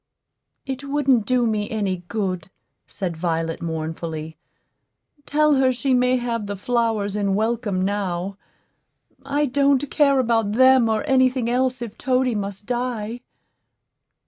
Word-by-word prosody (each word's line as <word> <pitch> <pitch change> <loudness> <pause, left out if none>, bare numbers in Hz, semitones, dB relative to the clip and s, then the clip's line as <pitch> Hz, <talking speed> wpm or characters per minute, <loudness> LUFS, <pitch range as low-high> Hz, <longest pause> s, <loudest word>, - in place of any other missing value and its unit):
"It 265 0 -5
wouldn't 275 -5 +1
do 250 -1 +2
me 215 -2 -1
any 200 -4 -1
good," 190 -5 -3 0.4
said 180 -4 -4
Violet, 165 -1 -2
mournfully. 160 -1 -4 0.9
"Tell 300 0 +3
her 260 -1 +4
she 260 +2 0
may 250 0 +3
have 230 -3 -3
the 205 - -3
flowers 220 -2 0
in 200 -2 0
welcome 215 -3 0
now. 195 -1 -2 0.9
I 285 +2 0
don't 280 +1 +2
care 280 -3 +4
about 225 -4 +1
them 260 -1 +5
or 220 +4 0
any 260 -2 +4
thing 250 -2 -3
else 255 0 0
if 225 -3 -9
Toady 255 -1 +1
must 200 -1 -4
die." 240 -1 -3
230 Hz, 135 wpm, -22 LUFS, 200-260 Hz, 0.9 s, them